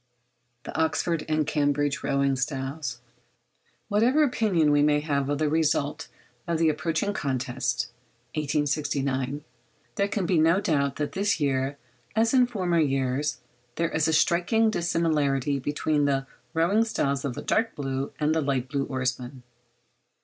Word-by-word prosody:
THE -, -, -8 dB
OXFORD 160 Hz, 0 st, 0 dB
AND 155 Hz, -1 st, +1 dB
CAMBRIDGE 145 Hz, -1 st, 0 dB
ROWING 140 Hz, -1 st, +1 dB
STYLES. 135 Hz, -1 st, -3 dB, 0.9 s
Whatever 235 Hz, +8 st, +3 dB
opinion 200 Hz, -, +2 dB
we 145 Hz, 0 st, +4 dB
may 150 Hz, 0 st, +3 dB
have 140 Hz, -2 st, -1 dB
of 145 Hz, -, 0 dB
the 155 Hz, +1 st, +1 dB
result 150 Hz, 0 st, 0 dB, 0.4 s
of 170 Hz, -1 st, 0 dB
the 160 Hz, 0 st, +3 dB
approaching 165 Hz, +6 st, -1 dB
contest 125 Hz, -5 st, -2 dB, 0.4 s
(1869), 145 Hz, -2 st, -1 dB, 0.5 s
there 200 Hz, -, +2 dB
can 200 Hz, -2 st, -2 dB
be 175 Hz, -2 st, +2 dB
no 165 Hz, +4 st, +4 dB
doubt 145 Hz, -8 st, 0 dB
that 150 Hz, -1 st, -2 dB
this 200 Hz, -1 st, 0 dB
year, 135 Hz, -1 st, 0 dB, 0.4 s
as 225 Hz, +2 st, +2 dB
in 250 Hz, -2 st, +5 dB
former 185 Hz, -8 st, 0 dB
years, 135 Hz, -1 st, 0 dB, 0.3 s
there 165 Hz, 0 st, 0 dB
is 155 Hz, 0 st, +1 dB
a 160 Hz, -, +1 dB
striking 180 Hz, +8 st, +3 dB
dissimilarity 150 Hz, -, +1 dB
between 145 Hz, +2 st, 0 dB
the 135 Hz, -1 st, +1 dB, 0.3 s
rowing 185 Hz, +7 st, +3 dB
styles 140 Hz, -11 st, -1 dB
of 135 Hz, -4 st, -3 dB
the -, -, -6 dB
dark 225 Hz, +1 st, 0 dB
blue 135 Hz, -1 st, -3 dB
and 150 Hz, +1 st, +2 dB
the 160 Hz, -, +1 dB
light 135 Hz, -3 st, -1 dB
blue 140 Hz, -1 st, -1 dB
oarsmen. 130 Hz, 0 st, -3 dB
150 Hz, 145 wpm, -26 LUFS, 140-165 Hz, 0.9 s, in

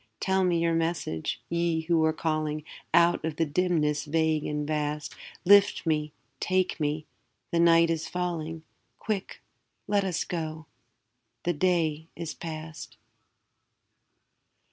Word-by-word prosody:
Tell 190 Hz, 0 st, +2 dB
me 180 Hz, -2 st, +2 dB
your 165 Hz, 0 st, +2 dB
message, 165 Hz, -, -1 dB
Ye 170 Hz, -1 st, 0 dB
who 160 Hz, 0 st, +2 dB
are 160 Hz, -, +3 dB
calling 155 Hz, -1 st, -1 dB, 0.3 s
Out 170 Hz, +1 st, +4 dB
of 160 Hz, -1 st, -2 dB
the 165 Hz, -, +1 dB
dimness 150 Hz, -2 st, +1 dB
vague 160 Hz, 0 st, +1 dB
and 150 Hz, 0 st, -2 dB
vast; 150 Hz, -1 st, -2 dB, 0.3 s
Lift 200 Hz, 0 st, +6 dB
me, 155 Hz, -2 st, 0 dB, 0.3 s
take 185 Hz, -1 st, +1 dB
me, 150 Hz, 0 st, -1 dB, 0.5 s
the 170 Hz, -, +1 dB
night 170 Hz, 0 st, +6 dB
is 160 Hz, 0 st, -2 dB
falling; 165 Hz, -3 st, -3 dB, 0.3 s
Quick, 205 Hz, -3 st, -4 dB, 0.4 s
let 200 Hz, 0 st, +2 dB
us 185 Hz, -3 st, -1 dB
go, 160 Hz, -2 st, -4 dB, 0.8 s
the 175 Hz, -, +1 dB
day 160 Hz, -2 st, +1 dB
is 165 Hz, -1 st, -5 dB
past. 155 Hz, -1 st, -8 dB
165 Hz, 125 wpm, -28 LUFS, 155-175 Hz, 0.8 s, Lift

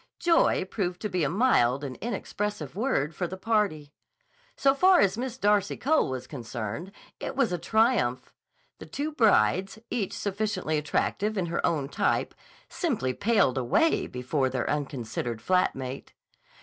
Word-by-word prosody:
Joy 335 Hz, -, +3 dB
proved 180 Hz, -3 st, -3 dB
to 210 Hz, -, -2 dB
be 180 Hz, -3 st, 0 dB
a 145 Hz, -, +1 dB
mild 145 Hz, -, +3 dB
and 135 Hz, -2 st, -5 dB
inexpressive 210 Hz, -, -4 dB
word 195 Hz, -, 0 dB
for 175 Hz, +2 st, -2 dB
the 190 Hz, -, -7 dB
party. 190 Hz, -9 st, 0 dB, 0.6 s
So 270 Hz, -1 st, +4 dB
far 365 Hz, +5 st, +5 dB
as 195 Hz, -, +3 dB
Miss 250 Hz, +1 st, -4 dB
Darcy 205 Hz, -3 st, +2 dB
Cole 310 Hz, -, +2 dB
was 130 Hz, -1 st, -4 dB
concerned, 120 Hz, -, -6 dB, 0.3 s
it -, -, -5 dB
was 265 Hz, -7 st, +2 dB
a 175 Hz, -, -1 dB
triumph. 220 Hz, -, +1 dB, 0.5 s
The -, -, -10 dB
two 295 Hz, +3 st, -3 dB
brides, 195 Hz, -, +3 dB
each 205 Hz, -6 st, -2 dB
sufficiently 200 Hz, -6 st, -1 dB
attractive 205 Hz, +8 st, -1 dB
in 185 Hz, -, 0 dB
her 170 Hz, 0 st, -2 dB
own 145 Hz, -5 st, 0 dB
type, -, -, 0 dB, 0.3 s
simply 220 Hz, -, -1 dB
paled 200 Hz, -, +2 dB
away 130 Hz, -, +2 dB
before 130 Hz, +2 st, -1 dB
their 130 Hz, -1 st, -2 dB
unconsidered 125 Hz, -5 st, -3 dB
flat 180 Hz, +10 st, +2 dB
mate. 130 Hz, 0 st, -7 dB
185 Hz, 150 wpm, -27 LUFS, 135-220 Hz, 0.6 s, far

